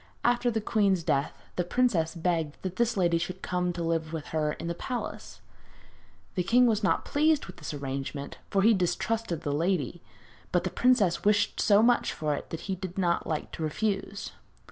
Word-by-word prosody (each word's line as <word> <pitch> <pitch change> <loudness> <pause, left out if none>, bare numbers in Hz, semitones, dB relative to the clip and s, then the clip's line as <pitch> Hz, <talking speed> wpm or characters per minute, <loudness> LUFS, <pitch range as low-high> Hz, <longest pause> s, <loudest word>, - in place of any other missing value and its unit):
After 245 0 +3
the 220 -2 -1
queen's 200 -5 +2
death 145 -3 0 0.2
the 180 - +2
princess 180 -5 +1
begged 165 -3 -1
that 185 -1 -4
this 235 -2 +1
lady 170 -2 +3
should 185 +2 -5
come 180 -1 0
to 170 0 -3
live 165 -1 -1
with 160 -3 -5
her 150 -1 0
in - - -7
the 170 - -1
palace. 245 +8 -5 0.9
The 185 - 0
king 240 +7 +4
was 220 -3 +2
not 200 - +2
quite - - -13
pleased 305 +1 +3
with 180 - -11
this 150 - -6
arrangement, 140 0 -5
for 195 -1 +2
he 225 +2 +6
distrusted 185 0 -1
the 145 - -1
lady; 170 0 0 0.5
but - - +2
the - - -2
princess 235 -9 +3
wished 205 0 +2
so 210 0 +5
much 240 +1 +3
for 150 -1 -1
it - - -5
that 165 - -5
he 195 - -3
did 185 0 -6
not 175 -3 +1
like 155 -2 -3
to - - -7
refuse. 195 +5 -2
180 Hz, 195 wpm, -28 LUFS, 165-215 Hz, 0.9 s, he